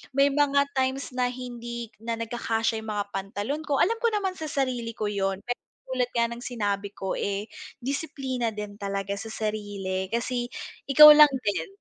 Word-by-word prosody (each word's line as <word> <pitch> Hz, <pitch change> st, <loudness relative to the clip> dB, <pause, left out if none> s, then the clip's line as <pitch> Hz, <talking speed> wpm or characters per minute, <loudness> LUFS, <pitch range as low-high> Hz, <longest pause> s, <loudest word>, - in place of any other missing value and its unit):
May 280 Hz, +1 st, +5 dB
mga 280 Hz, 0 st, +3 dB
times 265 Hz, +1 st, 0 dB
na 250 Hz, 0 st, +1 dB
hindi 240 Hz, -2 st, -6 dB
na 230 Hz, +1 st, -3 dB
nagkakasya 225 Hz, -1 st, -1 dB
yung 220 Hz, -, -5 dB
mga 205 Hz, -1 st, -1 dB
pantalon 205 Hz, +10 st, -3 dB
ko, 285 Hz, -, +1 dB
alam 455 Hz, +5 st, +3 dB
ko 470 Hz, -, +2 dB
naman 380 Hz, -2 st, -1 dB
sa 315 Hz, -, -4 dB
sarili 250 Hz, -5 st, -1 dB
ko 210 Hz, -1 st, -2 dB
yun 195 Hz, -1 st, -1 dB
pero 245 Hz, 0 st, -2 dB, 0.3 s
tulad 250 Hz, -1 st, 0 dB
nga 235 Hz, 0 st, +3 dB
ng 235 Hz, +1 st, -7 dB
sinabi 205 Hz, -5 st, -2 dB
ko, 190 Hz, -, -3 dB
eh, 200 Hz, +1 st, -2 dB, 0.3 s
disiplina 265 Hz, -3 st, -2 dB
din 210 Hz, -1 st, -7 dB
talaga 200 Hz, 0 st, -2 dB
sa 225 Hz, -, -6 dB
sarili 205 Hz, -4 st, -3 dB
kasi 240 Hz, +1 st, -1 dB, 0.4 s
ikaw 300 Hz, +2 st, +11 dB
lang 300 Hz, -1 st, +9 dB
din 205 Hz, -1 st, -1 dB
235 Hz, 175 wpm, -26 LUFS, 205-265 Hz, 0.4 s, ikaw